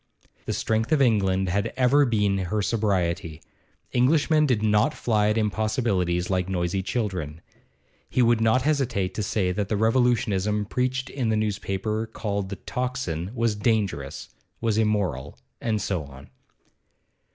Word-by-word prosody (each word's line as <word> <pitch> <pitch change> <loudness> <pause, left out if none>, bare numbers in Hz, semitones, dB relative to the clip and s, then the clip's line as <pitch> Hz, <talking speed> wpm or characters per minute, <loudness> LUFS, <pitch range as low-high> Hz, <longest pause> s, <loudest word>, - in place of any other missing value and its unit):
The - - -1
strength 110 +3 -1
of 155 - +4
England 95 -7 +2
had 100 +4 0
ever 135 +2 +4
been 105 -4 +1
her 100 +3 -1
sobriety; 90 -7 -1 0.5
Englishmen 150 +4 +3
did 115 -5 +1
not 110 +7 +2
fly 105 -3 +1
at 105 - +1
impossibilities 105 -5 0
like 95 -1 -1
noisy 90 +1 -1
children. 95 -8 -3 0.7
He 125 - +2
would 115 -1 +3
not 115 +3 +3
hesitate 130 -11 0
to - - -3
say 100 -3 0
that 100 +2 -2
the 105 - 0
revolutionism 105 -3 +1
preached 130 +4 -2
in 125 -5 -1
the 110 - +2
newspaper 105 +1 -2
called 100 -3 -3
the 100 - -4
'Tocsin' 125 -10 -3
was 115 -2 +1
dangerous, 100 - -1 0.3
was 110 -2 0
immoral. 100 - -1 0.2
And 110 -2 0
so 90 -6 -2
on. 70 0 -14
105 Hz, 140 wpm, -25 LUFS, 95-115 Hz, 0.7 s, of